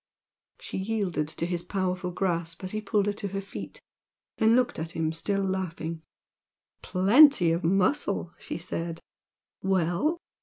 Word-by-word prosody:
She -, -, -5 dB
yielded 190 Hz, -7 st, -1 dB
to 160 Hz, +1 st, -2 dB
his 175 Hz, -1 st, -1 dB
powerful 185 Hz, -1 st, -2 dB
grasp 170 Hz, -2 st, -2 dB
as 185 Hz, -, -3 dB
he 215 Hz, -, -2 dB
pulled 210 Hz, -1 st, +1 dB
her 205 Hz, -, 0 dB
to 205 Hz, 0 st, -5 dB
her 195 Hz, 0 st, -3 dB
feet 195 Hz, 0 st, -8 dB, 0.6 s
then 225 Hz, 0 st, +5 dB
looked 250 Hz, -7 st, +1 dB
at 160 Hz, +1 st, -5 dB
him 160 Hz, -1 st, 0 dB
still 195 Hz, +4 st, -1 dB
laughing. 170 Hz, -4 st, -3 dB, 0.8 s
"Plenty 200 Hz, -, +6 dB
of 170 Hz, +2 st, 0 dB
muscle!" 195 Hz, -, +1 dB
she -, -, -5 dB
said 165 Hz, -1 st, -4 dB, 0.6 s
"Well?" 190 Hz, -, +1 dB
185 Hz, 145 wpm, -27 LUFS, 170-200 Hz, 0.8 s, Plenty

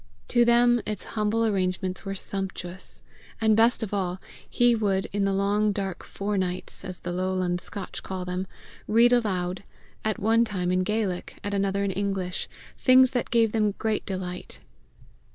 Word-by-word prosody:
To 240 Hz, -1 st, +5 dB
them 240 Hz, 0 st, +5 dB
its 210 Hz, -1 st, -4 dB
humble 220 Hz, +1 st, +1 dB
arrangements 185 Hz, -2 st, -1 dB
were 195 Hz, 0 st, -3 dB
sumptuous. 190 Hz, -2 st, -5 dB, 0.4 s
And 220 Hz, -1 st, +4 dB
best 225 Hz, +1 st, +4 dB
of 210 Hz, -, -4 dB
all, 185 Hz, -2 st, -1 dB, 0.3 s
he 240 Hz, 0 st, +4 dB
would, 200 Hz, -4 st, +1 dB
in 200 Hz, -1 st, +1 dB
the 195 Hz, -, +2 dB
long 200 Hz, +2 st, +2 dB
dark 195 Hz, -3 st, -4 dB
fore 200 Hz, 0 st, -2 dB
nights, 180 Hz, -1 st, -3 dB
as 185 Hz, -2 st, -7 dB
the 175 Hz, -, -4 dB
lowland 185 Hz, -1 st, -1 dB
Scotch 200 Hz, -3 st, -5 dB
call 185 Hz, -1 st, -5 dB
them, 180 Hz, +1 st, -3 dB, 0.4 s
read 235 Hz, +3 st, +5 dB
aloud, 185 Hz, -6 st, 0 dB, 0.4 s
at 215 Hz, 0 st, 0 dB
one 225 Hz, +3 st, +3 dB
time 185 Hz, -5 st, -1 dB
in 185 Hz, 0 st, +2 dB
Gaelic, 195 Hz, -2 st, -2 dB
at 205 Hz, -, -3 dB
another 200 Hz, 0 st, +1 dB
in 200 Hz, -, 0 dB
English, 190 Hz, -1 st, -2 dB, 0.3 s
things 255 Hz, 0 st, +6 dB
that 245 Hz, -2 st, -1 dB
gave 230 Hz, -2 st, +3 dB
them 210 Hz, -2 st, +1 dB
great 220 Hz, -1 st, 0 dB
delight. 185 Hz, -2 st, -5 dB
200 Hz, 165 wpm, -26 LUFS, 185-220 Hz, 0.4 s, things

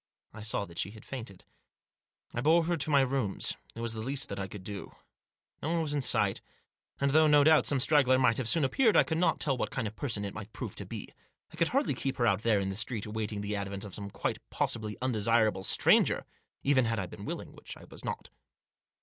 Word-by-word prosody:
I 110 Hz, -, -9 dB
saw 105 Hz, -1 st, -1 dB
that 85 Hz, -2 st, -10 dB
she 100 Hz, -, -1 dB
had 110 Hz, +1 st, -13 dB
fainted. 115 Hz, -8 st, -8 dB, 0.9 s
I 120 Hz, -, -2 dB
bore 165 Hz, +5 st, +4 dB
her 175 Hz, +1 st, +1 dB
to 155 Hz, -1 st, -2 dB
my 140 Hz, -2 st, +5 dB
rooms. 130 Hz, -6 st, +1 dB, 0.2 s
It 115 Hz, -, -6 dB
was 115 Hz, -1 st, 0 dB
the 110 Hz, -, -6 dB
least 135 Hz, +3 st, -2 dB
that -, -, -5 dB
I 95 Hz, -, -3 dB
could 95 Hz, 0 st, -9 dB
do. 100 Hz, 0 st, -7 dB, 0.7 s
No 150 Hz, -, -2 dB
one 170 Hz, -, +1 dB
was 150 Hz, -2 st, -2 dB
in 145 Hz, -, 0 dB
sight. -, -, +2 dB, 0.6 s
And 140 Hz, 0 st, +2 dB
though, 155 Hz, +2 st, +5 dB
no 145 Hz, -1 st, +6 dB
doubt, 155 Hz, +1 st, +5 dB
some 140 Hz, -, +2 dB
straggler 135 Hz, -2 st, +4 dB
might 125 Hz, -3 st, +3 dB
have 125 Hz, -3 st, 0 dB
soon 165 Hz, -, +2 dB
appeared, 220 Hz, -, +3 dB
I -, -, +7 dB
could 160 Hz, 0 st, -2 dB
not 180 Hz, -, +2 dB
tell 140 Hz, -3 st, +1 dB
what 125 Hz, -, -2 dB
kind 110 Hz, -, -2 dB
of 105 Hz, -, -8 dB
person 110 Hz, -7 st, -2 dB
it 100 Hz, -, -5 dB
might 105 Hz, 0 st, -8 dB
prove -, -, -6 dB
to -, -, -7 dB
be. -, -, -6 dB, 0.4 s
I -, -, -9 dB
could 170 Hz, -, +2 dB
hardly 275 Hz, -, +1 dB
keep 135 Hz, -1 st, -3 dB
her 120 Hz, -, +2 dB
out 100 Hz, -2 st, +2 dB
there 110 Hz, -3 st, +3 dB
in 95 Hz, 0 st, -2 dB
the 95 Hz, -, -4 dB
street 110 Hz, +1 st, -1 dB
awaiting 105 Hz, -1 st, -3 dB
the 105 Hz, +1 st, -3 dB
advent 100 Hz, 0 st, -4 dB
of 100 Hz, -, -9 dB
some 100 Hz, -1 st, -6 dB
quite -, -, -3 dB
possibly 110 Hz, -2 st, -1 dB
undesirable 110 Hz, -4 st, +2 dB
stranger, -, -, +3 dB, 0.4 s
even 135 Hz, -3 st, +3 dB
had 115 Hz, 0 st, 0 dB
I 95 Hz, -, -1 dB
been -, -, -10 dB
willing, -, -, -5 dB
which -, -, -9 dB
I -, -, -14 dB
was -, -, -11 dB
not. -, -, -5 dB
115 Hz, 240 wpm, -30 LUFS, 105-140 Hz, 0.9 s, I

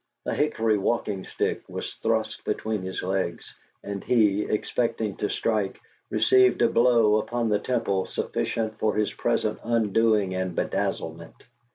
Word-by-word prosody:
A -, -, -1 dB
hickory 110 Hz, -8 st, +1 dB
walking 100 Hz, -2 st, -1 dB
stick -, -, -2 dB
was -, -, -5 dB
thrust -, -, -1 dB
between 110 Hz, -2 st, -2 dB
his 95 Hz, 0 st, -5 dB
legs; 95 Hz, -2 st, -2 dB, 0.3 s
and 100 Hz, -1 st, -5 dB
he, 105 Hz, -4 st, +3 dB
expecting 110 Hz, -1 st, -1 dB
to 105 Hz, -, -1 dB
strike, 105 Hz, -4 st, -1 dB, 0.3 s
received 125 Hz, +4 st, +4 dB
a -, -, +5 dB
blow 115 Hz, -3 st, +4 dB
upon 115 Hz, +1 st, -1 dB
the 105 Hz, -1 st, +2 dB
temple 110 Hz, -6 st, -1 dB
sufficient 110 Hz, -1 st, -2 dB
for 110 Hz, -1 st, +1 dB
his 105 Hz, -1 st, 0 dB
present 110 Hz, -2 st, 0 dB
undoing 110 Hz, -3 st, +2 dB
and 95 Hz, -2 st, -2 dB
bedazzlement. 80 Hz, 0 st, -3 dB
110 Hz, 140 wpm, -26 LUFS, 100-115 Hz, 0.3 s, a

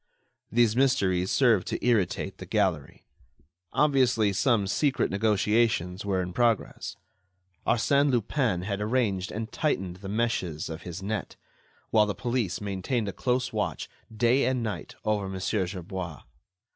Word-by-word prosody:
These 115 Hz, -2 st, +3 dB
mysteries 100 Hz, -9 st, +2 dB
served 115 Hz, -8 st, +3 dB
to -, -, -3 dB
irritate 110 Hz, -7 st, +1 dB
the -, -, -8 dB
gallery. -, -, -1 dB, 0.7 s
Obviously, 125 Hz, -8 st, +3 dB
some 115 Hz, -1 st, +2 dB
secret 135 Hz, +7 st, +1 dB
negotiations 105 Hz, -2 st, +1 dB
were 95 Hz, -2 st, 0 dB
in 90 Hz, 0 st, -6 dB
progress. 115 Hz, 0 st, 0 dB, 0.7 s
Arsène 140 Hz, +5 st, +3 dB
Lupin 120 Hz, -5 st, 0 dB
had 100 Hz, +1 st, -3 dB
arranged 105 Hz, -4 st, 0 dB
and 110 Hz, +1 st, -5 dB
tightened 95 Hz, -, -1 dB
the 95 Hz, +1 st, -8 dB
meshes 100 Hz, -9 st, -1 dB
of 80 Hz, -, -6 dB
his 90 Hz, +2 st, -7 dB
net, 105 Hz, -1 st, -3 dB, 0.6 s
while 105 Hz, -1 st, +5 dB
the 105 Hz, -, -2 dB
police 120 Hz, -5 st, -1 dB
maintained 105 Hz, +3 st, -2 dB
a -, -, -5 dB
close 125 Hz, 0 st, -1 dB
watch, 105 Hz, -1 st, -2 dB, 0.2 s
day 120 Hz, +5 st, +3 dB
and 130 Hz, -2 st, 0 dB
night, 100 Hz, -8 st, -5 dB
over 105 Hz, -3 st, 0 dB
Mon. 95 Hz, -, -5 dB
Gerbois. 95 Hz, -3 st, -3 dB
105 Hz, 135 wpm, -27 LUFS, 95-120 Hz, 0.7 s, while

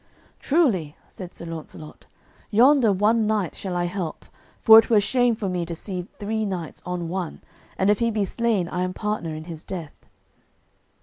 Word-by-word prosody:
"Truly," 220 Hz, -, +1 dB
said 180 Hz, -2 st, -9 dB
Sir 170 Hz, -, -10 dB
Launcelot, 160 Hz, -2 st, -9 dB, 0.4 s
"yonder 245 Hz, +1 st, +5 dB
one 215 Hz, +3 st, +2 dB
knight 210 Hz, -5 st, 0 dB
shall 185 Hz, -2 st, -5 dB
I 175 Hz, -, 0 dB
help, 175 Hz, -2 st, -5 dB, 0.3 s
for 220 Hz, 0 st, +9 dB
it -, -, 0 dB
were 220 Hz, -3 st, +5 dB
shame 240 Hz, +3 st, +2 dB
for 215 Hz, -3 st, -4 dB
me 180 Hz, -2 st, -1 dB
to 170 Hz, 0 st, -5 dB
see 180 Hz, +1 st, -6 dB
three 220 Hz, +1 st, -2 dB
knights 185 Hz, -6 st, -5 dB
on 180 Hz, -1 st, -3 dB
one, 180 Hz, -1 st, -5 dB, 0.3 s
and 190 Hz, +2 st, +3 dB
if 210 Hz, -, +1 dB
he 235 Hz, -1 st, +2 dB
be 215 Hz, -3 st, 0 dB
slain 220 Hz, -3 st, 0 dB
I 180 Hz, -, -3 dB
am 185 Hz, 0 st, -1 dB
partner 210 Hz, -7 st, -3 dB
in 155 Hz, -, -7 dB
his 165 Hz, -1 st, -9 dB
death." 170 Hz, -6 st, -8 dB
190 Hz, 180 wpm, -24 LUFS, 175-220 Hz, 0.4 s, for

